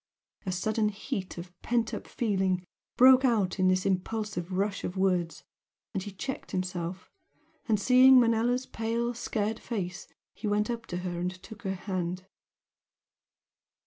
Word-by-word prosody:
A - - +1
sudden 215 +4 +1
heat 195 -2 -5
of 175 +1 -8
pent 235 -1 0
up - - -5
feeling 190 -5 0 0.3
broke 260 +1 +8
out 210 -7 +2
in 185 - +4
this 185 0 +2
impulsive 195 -1 -2
rush 200 +2 -1
of 180 - -4
words; 180 -3 0 0.5
he 195 0 -3
checked 260 +8 -5
himself, 185 -1 -3 0.6
and 215 -2 +3
seeing 255 +3 +7
Manella's 240 +2 +2
pale, 230 +1 -2
scared 220 -2 -2
face 185 -6 -4 0.3
he 215 - -5
went 210 +2 +1
up 230 -1 -5
to 175 - -4
her 175 -1 -3
and 180 +1 0
took 220 -1 -11
her 195 -3 -2
hand. 185 -1 -3
200 Hz, 145 wpm, -29 LUFS, 185-230 Hz, 0.6 s, broke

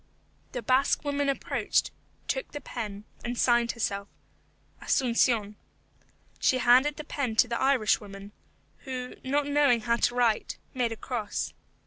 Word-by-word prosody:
The 245 - -4
Basque 260 +5 +2
woman 285 0 0
approached, 275 - 0 0.4
took - - -3
the 290 - -4
pen, 215 -6 -6 0.2
and 240 0 -3
signed 240 -1 +3
herself, 200 -3 -2 0.7
ASUNCION. 230 -5 +1 0.8
She 260 - +3
handed 255 +4 +4
the 305 - -5
pen 275 -6 -3
to 245 - +5
the 235 0 -2
Irish 260 -7 +3
woman, 200 0 -10 0.5
who, 255 -1 -6
not 285 +2 +1
knowing 285 -5 +3
how 235 0 +1
to 240 - +1
write, 235 -3 +1 0.2
made 245 -3 0
a 225 - -5
cross. 220 -4 -3
245 Hz, 140 wpm, -28 LUFS, 225-270 Hz, 0.8 s, to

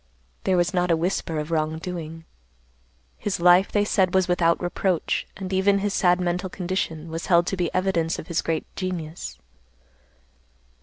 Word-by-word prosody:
There 185 -1 +3
was 175 +2 +1
not 180 -1 +1
a 165 - +3
whisper 165 -1 -1
of 150 +2 -4
wrong 155 -1 0
doing. 165 -1 -6 0.9
His 200 -3 -2
life, 180 +2 +5
they 205 0 +2
said, 190 -3 +2
was 190 -1 +3
without 170 -2 +2
reproach, 175 -1 -1
and 190 0 -5
even 195 +1 +3
his 200 0 -1
sad 180 -2 +3
mental 180 +1 -1
condition 175 -4 -3
was 165 +1 -4
held 170 -1 +4
to 195 - -1
be 175 -2 -1
evidence 180 -3 0
of - - -7
his 170 -1 -1
great 160 -1 -2
genius. 165 - -5
175 Hz, 165 wpm, -24 LUFS, 165-185 Hz, 0.9 s, life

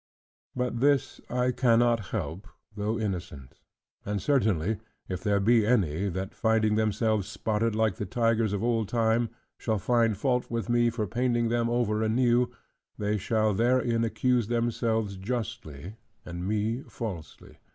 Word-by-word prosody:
But 125 -2 -1
this 140 +1 +2
I 125 +1 +1
cannot 120 -4 +3
help, 85 +6 -4 0.3
though 105 +2 -1
innocent. 90 - -5 0.4
And 100 0 -2
certainly, 110 - +1 0.3
if 90 -2 -4
there 100 -2 +2
be 115 +3 +4
any, 100 -5 +1
that 95 +2 -4
finding 110 -1 +2
themselves 110 -1 +1
spotted 110 +1 -1
like 110 -3 +1
the 105 - -4
tigers 115 +1 +1
of 100 0 -2
old 115 -3 0
time, 115 0 +2 0.3
shall 110 -2 0
find 115 +1 +2
fault 125 +2 0
with 115 0 -3
me 120 0 +3
for 115 -2 -2
painting 120 +1 0
them 115 0 +1
over 115 -3 +1
anew, 120 +2 +2 0.5
they 105 0 -1
shall 110 +1 +1
therein 120 +1 +2
accuse 115 +1 +1
themselves 115 -3 0
justly, 105 - -5 0.3
and 85 +1 -5
me 110 +4 0
falsely. 95 - -7
110 Hz, 140 wpm, -28 LUFS, 105-120 Hz, 0.5 s, be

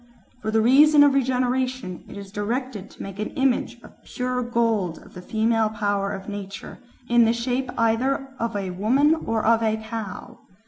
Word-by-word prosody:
"For 215 - -3
the 220 - +1
purpose 290 +6 +6
of 290 -1 +7
regeneration 255 -5 -1
it - - -10
is 200 -1 -9
directed 215 0 -3
to - - -10
make 195 0 -8
an 215 - -2
image 265 -3 0
of - - -17
pure 250 0 -3
gold 230 -8 0
of - - -16
the 180 - -9
female 220 +2 +1
power 205 -2 -1
of 195 -1 -7
nature, 200 -1 -7 0.3
in 240 -1 +5
the 225 - +3
shape 250 +2 -2
either 260 +4 +1
of 230 -1 -2
a 195 -2 -3
woman 255 - +3
or 225 -9 -2
of 230 0 +4
a 220 -1 +1
cow. 220 -3 -7
230 Hz, 180 wpm, -24 LUFS, 205-255 Hz, 0.3 s, of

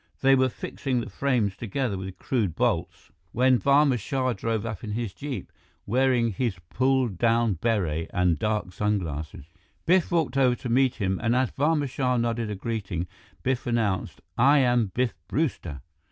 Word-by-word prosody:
They 135 0 +5
were 130 -1 +4
fixing 130 +1 -3
the 115 - -6
frames 115 -5 0
together 115 +1 -2
with 95 0 -6
crude 105 - -1
bolts - - -1 0.2
when 130 +1 +4
Barma 140 +1 +4
Shah 130 +3 -1
drove 115 -2 -2
up 110 -1 -5
in 105 -2 -4
his 115 -3 -3
jeep, 140 -9 -6 0.3
wearing 125 0 +2
his 110 -2 -2
pulled 130 -7 +1
down 115 -2 +3
beret 90 -9 0
and 90 -5 +1
dark 105 -4 -1
sun 105 +2 +1
glasses. 80 -5 -6 0.4
Biff 180 0 +3
walked 160 -6 +1
over 130 -2 +4
to 125 - -6
meet 130 +1 +3
him 95 -3 -1
and 115 +1 +1
as 130 -2 +1
Barma 150 0 +1
Shah 125 -1 0
nodded 115 -1 -1
a 105 - -3
greeting, 95 -5 -3 0.4
Biff 130 -1 -1
announced, 110 -6 -1 0.2
"I 140 +4 +6
am 125 -4 +3
Biff 120 +5 -1
Brewster." 90 - -2
120 Hz, 170 wpm, -26 LUFS, 100-130 Hz, 0.4 s, I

